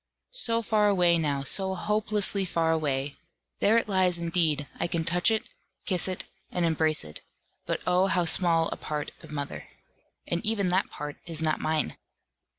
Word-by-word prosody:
So 230 0 +1
far 210 -1 +2
away 175 -4 +3
now, 145 -3 -1
so 190 +6 +3
hopelessly 210 0 0
far 165 -3 0
away! 145 -3 -1 0.4
There 220 +3 +4
it 230 - 0
lies 185 -3 +2
indeed, 165 -4 +1
I - - 0
can 165 -1 -2
touch 175 +4 +3
it, 220 -1 -2 0.3
kiss 185 -3 +2
it, 185 -1 -3 0.2
and 175 -1 -1
embrace 160 - +2
it; 75 -1 -8 0.5
but - - -2
oh 180 +1 +3
how 180 -2 +1
small 165 -1 +3
a - - -5
part 150 -1 -4
of - - -13
mother! 145 -2 -6 0.6
and 170 - -2
even 210 -4 +1
that 185 +2 +1
part 150 0 -7
is 165 -2 -1
not 155 -1 0
mine. 155 -1 -1
170 Hz, 170 wpm, -27 LUFS, 155-190 Hz, 0.6 s, There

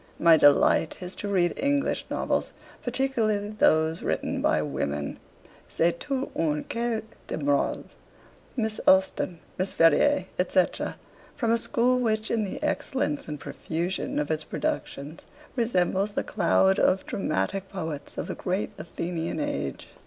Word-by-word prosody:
My 165 -1 +7
delight 145 +2 +4
is 180 0 -6
to 205 - -4
read 180 -3 +2
English 280 0 0
novels, - - -1 0.3
particularly 235 -5 0
those 160 -6 +2
written - - -1
by - - +2
women. 70 0 -3 0.5
"C'est 170 +1 +1
toute 275 -2 -3
une 150 -2 0
ecole 235 -2 -2 0.2
de - - -3
morale." 145 -2 +1 0.7
Miss 220 -2 -1
Austen, 190 -2 +3 0.2
Miss 185 +1 +1
Ferrier, 165 - +4
&c., - - +4 0.7
form 230 -3 0
a 230 - +4
school 250 0 +2
which 220 -2 0
in 225 -2 +1
the 195 - -4
excellence 265 - -1
and 150 -1 -5
profusion 170 +6 -3
of 150 +1 0
its 155 0 0
productions 145 +2 -4 0.3
resembles 200 -4 +1
the - - -1
cloud 190 -1 +3
of 190 +1 +3
dramatic 190 - -2
poets 160 -7 -5
of - - -2
the - - -4
great 185 +3 -2
Athenian 170 - -3
age.' 290 -1 -3
190 Hz, 140 wpm, -27 LUFS, 160-230 Hz, 0.7 s, My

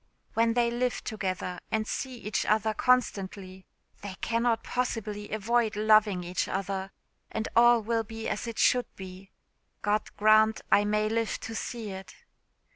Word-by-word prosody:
When 230 0 +2
they 240 -1 +2
live 245 +1 -1
together, 185 -4 -3
and 220 0 0
see 260 +3 -4
each 210 -3 -2
other 220 0 +2
constantly, 195 -6 0 0.3
they 195 -2 -6
cannot 230 0 0
possibly 215 -4 -3
avoid 220 +1 +1
loving 210 -3 +4
each 180 +1 -2
other, 195 0 -3 0.4
and 220 0 -3
all 240 -1 +6
will 225 +1 0
be 225 +1 -6
as - - -3
it 230 - -6
should 250 -1 +3
be. 190 0 -10 0.5
God 210 0 0
grant 215 +1 +4
I 205 - +5
may 210 +1 +1
live 225 0 -1
to 225 - -6
see 225 -2 -5
it!" 190 0 -9
215 Hz, 150 wpm, -28 LUFS, 200-230 Hz, 0.5 s, all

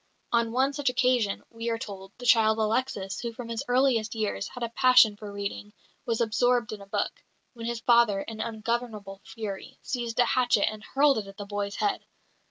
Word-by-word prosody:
On 235 -1 +2
one 265 +3 +2
such 285 -2 0
occasion, 250 -4 +1
we 230 0 -4
are 230 - 0
told, 195 -3 -8
the 245 - -9
child 220 -3 +5
Alexis, 215 -3 -1
who 235 - -3
from 230 0 -8
his 230 -1 -3
earliest 245 -3 +2
years 215 -2 -2
had 245 - -7
a 235 - -1
passion 235 -3 +5
for 205 0 -9
reading, 200 +1 -5 0.3
was 230 -1 0
absorbed 235 +1 +2
in 210 - -8
a 200 - -12
book, - - -2 0.3
when 230 -2 -6
his 235 -1 -3
father, 235 -5 +4
in 220 +1 -6
ungovernable 220 -3 -3
fury, 205 -4 -7
seized 235 -3 -3
a 245 - +5
hatchet 245 -5 +2
and 215 -1 -4
hurled 275 -1 +3
it 205 - -7
at 195 0 -12
the 205 - -6
boy's 205 0 -3
head. 410 -1 -1
230 Hz, 195 wpm, -27 LUFS, 210-245 Hz, 0.3 s, child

